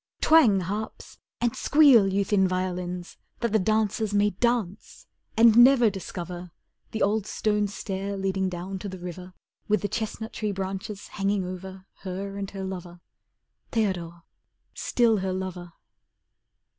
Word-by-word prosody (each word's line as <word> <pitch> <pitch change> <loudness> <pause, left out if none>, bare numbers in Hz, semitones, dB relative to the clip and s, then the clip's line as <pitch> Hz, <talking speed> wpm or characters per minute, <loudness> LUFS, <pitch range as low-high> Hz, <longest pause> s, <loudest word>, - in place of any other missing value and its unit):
Twang 250 -12 +5
harps, 205 +5 -6 0.2
and 240 -1 0
squeal, 280 -9 +6
you 200 +1 +1
thin 190 -1 +3
violins, 180 -1 -3 0.2
That 235 -2 0
the 220 - +3
dancers 215 +1 0
may 205 0 +3
dance, 220 -2 -2 0.3
and 225 -1 +7
never 240 -2 +7
discover 180 -2 -7 0.4
The 220 - -1
old 210 +1 +1
stone 210 -1 0
stair 200 0 -4
leading 190 -1 -1
down 185 +2 -5
to 200 - -5
the 190 - -7
river 180 +1 -8 0.3
With 210 0 +1
the - - +1
chestnut 220 +2 -4
tree 210 -2 -2
branches 195 +2 -5
hanging 195 -1 -1
over 185 +1 -8
Her 195 +1 -5
and 200 -1 -4
her 195 -1 -6
lover. 180 -2 -7 0.7
Theodore, 175 -7 -2 0.5
still 235 -3 +2
her 190 -1 -2
lover! 185 -2 -5
195 Hz, 140 wpm, -26 LUFS, 185-215 Hz, 0.7 s, and